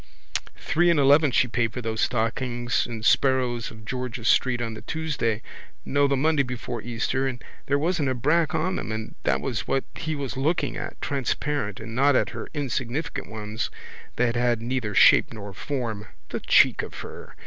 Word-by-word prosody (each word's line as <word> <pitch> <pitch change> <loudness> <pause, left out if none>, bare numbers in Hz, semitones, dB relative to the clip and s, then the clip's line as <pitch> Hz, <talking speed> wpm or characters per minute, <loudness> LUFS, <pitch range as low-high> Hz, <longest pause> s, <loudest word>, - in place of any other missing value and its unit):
Three 175 +2 +2
and 170 -3 +4
eleven 145 +2 +6
she 130 0 +3
paid 115 -1 0
for 125 - -4
those 110 -1 -2
stockings 120 +1 0
in 115 -2 -6
Sparrow's 125 -2 +2
of 110 -1 -13
George's 125 -1 -3
street 130 -2 +3
on 115 -2 -3
the 110 - -8
Tuesday, 135 -9 -2 0.4
no 140 +1 +3
the 140 -1 +1
Monday 155 +1 +3
before 125 -2 -4
Easter 120 +3 -1
and 125 -2 -4 0.3
there 140 - +3
wasn't 155 -2 +1
a 130 - 0
brack 155 +6 +2
on 185 +4 0
them - - -4
and 110 0 -4
that 65 +1 +2
was 100 - -3
what 135 - +1
he 160 -2 -3
was 140 -3 -4
looking 150 +6 0
at, - - -6
transparent, 135 -5 -1
and 115 0 -7
not 140 +3 +4
at - - +2
her - - -6
insignificant 135 +1 -2
ones 110 0 -4 0.5
that 120 -1 +1
had 120 -1 +2
neither 115 -3 -2
shape - - +6
nor 100 -2 -8
form 115 -2 -4 0.2
(the - - -3
cheek - - +5
of - - -8
her!) - - -10
125 Hz, 180 wpm, -25 LUFS, 115-140 Hz, 0.5 s, eleven